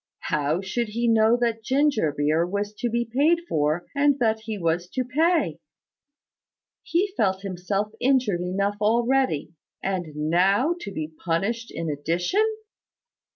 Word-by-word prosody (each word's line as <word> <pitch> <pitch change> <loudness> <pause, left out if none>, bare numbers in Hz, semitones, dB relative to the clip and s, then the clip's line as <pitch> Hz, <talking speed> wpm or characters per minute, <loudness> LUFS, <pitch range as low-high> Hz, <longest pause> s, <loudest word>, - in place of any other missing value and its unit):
How 150 +4 +1
should 225 +5 -2
he 235 +3 -1
know 225 +1 +4
that 235 -2 0
the - - -25
ginger 265 - +2
beer 150 +3 +1
was 205 +4 -3
to 240 - 0
be 235 +1 0
paid 290 +9 +2
for, 155 - 0
and 285 0 +3
that 220 -4 +1
he 220 -1 -3
was 170 -1 -1
to 255 - -1
pay? 275 - +1 1.2
He 375 +3 0
felt 190 - 0
himself 195 +2 -2
injured 250 -9 +2
enough 200 +3 -1
already: 235 - +1 0.3
and 190 -3 -2
now 185 - +2
to 200 - -6
be 155 -3 -5
punished 205 +8 -1
in 165 - -5
addition! 170 - 0
205 Hz, 145 wpm, -25 LUFS, 175-245 Hz, 1.2 s, know